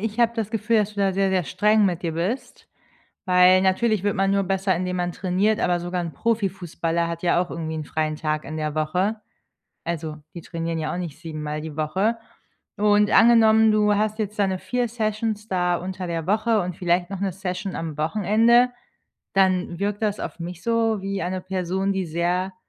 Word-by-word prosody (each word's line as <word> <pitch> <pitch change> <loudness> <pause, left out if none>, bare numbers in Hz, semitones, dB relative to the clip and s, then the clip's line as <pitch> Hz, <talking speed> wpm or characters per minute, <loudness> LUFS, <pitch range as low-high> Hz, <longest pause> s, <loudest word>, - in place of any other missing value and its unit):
ich 220 +2 -2
habe 235 0 +4
das 215 -2 -2
Gefühl, 225 +1 +1
dass 210 0 -1
du 205 - -3
da 195 -1 +2
sehr, 195 0 +1
sehr 185 -3 +1
streng 210 +6 +3
mit 180 -3 0
dir 165 -2 -2
bist, 190 +11 -4 0.6
weil 185 0 +6
natürlich 195 +2 +1
wird 205 -1 0
man 195 0 +1
nur 200 0 +2
besser, 190 0 0
indem 180 +1 -2
man 175 0 -1
trainiert, 195 +4 0
aber 175 -1 +1
sogar 175 +1 -3
'n 165 -2 -5
Profifußballer 180 -6 -1
hat 170 +1 -5
ja 175 0 +3
auch 180 - -4
irgendwie 160 -1 -4
'n 155 -2 -4
freien 155 0 -2
Tag 155 0 -2
in 155 - -6
der 155 -1 -3
Woche. 185 +8 0 0.6
Also, 160 -2 -4 0.2
die 170 - -8
trainieren 165 0 -4
ja 155 - -2
auch - - -3
nicht 165 -4 -6
siebenmal 155 -3 -5
Mal - - -5
die 155 -2 -7
Woche. 190 +9 0 0.6
Und, 210 0 +3
angenommen, 220 -1 +6
du 210 -1 +3
hast 215 +1 -1
jetzt 210 0 -3
deine 190 -2 +1
4 245 -1 -1
Sessions 215 -1 -2
da 180 -2 +1
unter 185 0 -5
der 165 -1 -3
Woche 215 +1 +2
und 180 -1 -4
vielleicht 175 0 +1
noch 195 -2 -5
'ne 195 -2 0
Session 190 0 -4
am 160 -2 -5
Wochenende, 215 +9 +3 0.6
dann 185 -3 +2
wirkt 205 +1 -2
das 210 -1 0
auf - - -6
mich 175 +1 -7
so 225 -2 +1
wie 195 0 -3
eine 185 +1 -3
Person, 190 +1 -1
die 190 -2 -2
sehr 175 +3 -1
190 Hz, 200 wpm, -23 LUFS, 170-210 Hz, 0.6 s, weil